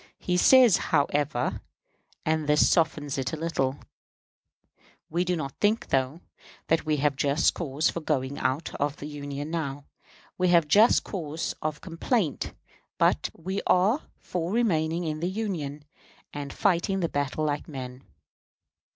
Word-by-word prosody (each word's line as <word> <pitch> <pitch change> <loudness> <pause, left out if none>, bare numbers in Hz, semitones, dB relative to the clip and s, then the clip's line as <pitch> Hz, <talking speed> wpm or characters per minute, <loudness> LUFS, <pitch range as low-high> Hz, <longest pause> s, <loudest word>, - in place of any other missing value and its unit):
He 180 - -1
says, 245 +2 +7
however, 145 -3 0 0.6
and 155 -1 0
this 150 0 +5
softens 150 -4 +1
it 135 - -2
a - - -2
little: 145 -4 -1 1.3
"We 170 +2 +1
do 180 0 0
not 140 -5 -4
think, 215 +2 +1
though, 135 +5 0 0.5
that 160 -1 +1
we 155 -1 +2
have 145 0 +1
just 145 +2 +2
cause 155 -1 -1
for - - -4
going 140 -3 -1
out 140 +5 -1
of 145 0 0
the - - -8
Union 145 0 -6
now. 145 -4 -3 0.5
We 180 - +3
have 170 -3 +4
just 215 +9 +5
cause 160 -4 -4
of 155 -1 -3
complaint; 170 - -1 0.5
but - - +2
we 190 +4 -3
are 200 +11 +3 0.2
for 175 0 -4
remaining 175 -7 +1
in 155 -2 -3
the 175 +3 -1
Union, 170 -9 -4 0.5
and 145 -1 -5
fighting 190 +2 +1
the 170 - +1
battle 145 +2 -1
like 145 -1 -2
men." 130 -3 -7
155 Hz, 145 wpm, -27 LUFS, 145-175 Hz, 1.3 s, says